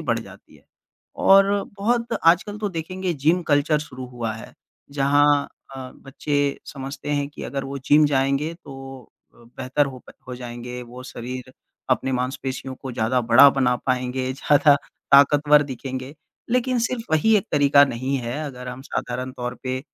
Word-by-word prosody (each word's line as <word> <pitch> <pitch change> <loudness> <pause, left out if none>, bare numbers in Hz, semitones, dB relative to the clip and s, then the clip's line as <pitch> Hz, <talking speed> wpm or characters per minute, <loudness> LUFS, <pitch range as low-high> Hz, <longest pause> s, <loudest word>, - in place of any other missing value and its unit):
बढ़ - - 0
जाती - - -13
है। - - -25 0.6
और 195 0 +7 0.3
बहुत 235 +3 0
आजकल 195 +5 +3
तो 210 -1 -2
देखेंगे 185 +1 -4
जिम 160 +6 +1
कल्चर 145 +1 +3
शुरू 130 -4 -8
हुआ 120 -3 -4
है। 115 - -11 0.4
जहाँ 145 +1 +3 0.3
अ, 130 -1 -7
बच्चे 145 +1 -2
समझते 135 +1 -6
हैं 145 -1 0
कि 145 - -11
अगर 135 -1 -4
वो 140 +1 -5
जिम 150 +3 +4
जाएँगे 140 +3 0
तो 135 -2 -10 0.2
बेहतर 130 +4 -2
हो 130 -2 -8
प - - -11 0.2
हो 125 - -5
जाएँगे। 125 0 -7
वो 125 +1 -11
शरीर 130 +1 -8 0.4
अपने 130 +1 +1
मांसपेशियों 130 +1 -3
को 130 -2 -8
ज़्यादा 120 +3 0
बड़ा 120 +4 +7
बना 125 -2 +1
पाएँगे, 130 0 -1
ज़्यादा 145 +1 +4 0.4
ताकतवर 145 +1 +6
दिखेंगे। 130 0 -6 0.4
लेकिन 250 +1 +1
सिर्फ 235 0 -1
वही 210 +8 +4
एक 210 - -1
तरीका 145 -1 +6
नहीं 130 +1 -2
है। 120 +3 -4
अगर 125 -3 -7
हम 125 +1 -7
साधारण 125 -1 -4
तौर 125 -1 -5
पे 130 0 -3
135 Hz, 160 wpm, -23 LUFS, 130-150 Hz, 0.6 s, और